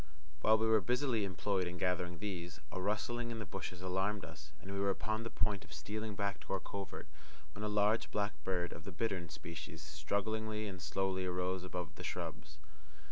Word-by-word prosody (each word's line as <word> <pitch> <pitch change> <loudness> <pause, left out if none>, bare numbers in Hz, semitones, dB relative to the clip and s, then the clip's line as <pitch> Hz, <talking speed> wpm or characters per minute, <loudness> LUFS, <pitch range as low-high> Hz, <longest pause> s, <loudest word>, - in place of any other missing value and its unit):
While 110 +5 +7
we 110 - +3
were 110 -1 +6
busily 125 +1 +3
employed 95 0 +1
in 90 0 -3
gathering 90 -1 +1
these, 90 -3 -3
a 95 - -2
rustling 120 +4 +1
in 115 - -2
the 110 - -3
bushes 90 -1 -4
alarmed 95 +1 +1
us, 75 -1 -9
and 95 +3 -7
we 100 - 0
were 100 0 +4
upon 110 +3 +1
the 115 - -3
point 105 -3 +1
of 75 - -16
stealing 105 +8 -3
back 100 -3 0
to - - -4
our 95 - +2
covert, 100 -2 -5 0.5
when 105 - -5
a - - +2
large 105 +2 +4
black 105 0 +1
bird 90 -2 +1
of 80 - -8
the 100 - -5
bittern 90 -2 0
species 80 0 -6
strugglingly 105 +8 0
and 95 -3 -5
slowly 95 +3 +1
arose 90 0 +1
above 90 -3 -3
the - - -6
shrubs. 75 0 -3
95 Hz, 195 wpm, -37 LUFS, 85-105 Hz, 0.5 s, While